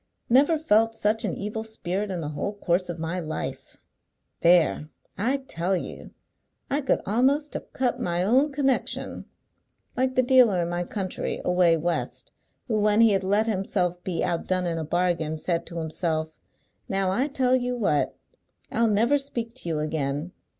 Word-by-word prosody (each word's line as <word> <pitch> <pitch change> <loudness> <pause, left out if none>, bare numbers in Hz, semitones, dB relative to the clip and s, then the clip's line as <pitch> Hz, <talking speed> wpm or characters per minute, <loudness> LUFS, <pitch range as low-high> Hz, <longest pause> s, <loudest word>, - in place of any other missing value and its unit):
"Never 285 +6 +5
felt 225 -7 +3
such 220 +1 +1
an 195 - -2
evil 210 +2 -4
spirit 205 -2 -3
in 180 -3 -3
the 150 - -4
whole 155 +7 -3
course 180 -2 0
of 175 - -4
my 165 +2 -3
life! 155 -2 -5 0.6
There! 170 -3 +3 0.3
I 245 +9 0
tell 190 -8 -2
you! - - -7 0.6
I 285 +2 +1
could 270 - 0
a'most 270 +8 +1
have - - -6
cut 255 -2 -1
my 175 0 0
own 260 +9 +3
connection. 270 -2 -1 0.7
Like 260 0 0
the 255 - +4
dealer 245 -7 +5
in 170 - -3
my 175 0 -2
country, 190 -1 -3
away 180 -2 +4
West, 170 +2 -3 0.4
who 220 -4 0
when 210 +1 +3
he 225 -2 +6
had 195 -1 +1
let 205 +3 +2
himself 185 -4 -1
be 180 -3 -2
outdone 180 +2 0
in 165 -1 -1
a - - -2
bargain, 165 -1 0
said 170 +1 -2
to 170 - -7
himself, 160 0 -2 0.6
'Now 195 -1 +1
I 255 +9 +1
tell 260 -3 +2
you 250 -1 -1
what! 170 -10 0 0.5
I'll 230 0 +2
never 230 +8 +3
speak 235 -4 -4
to 245 -9 -5
you 160 - -1
again.' 150 +1 -2
195 Hz, 170 wpm, -25 LUFS, 170-240 Hz, 0.7 s, he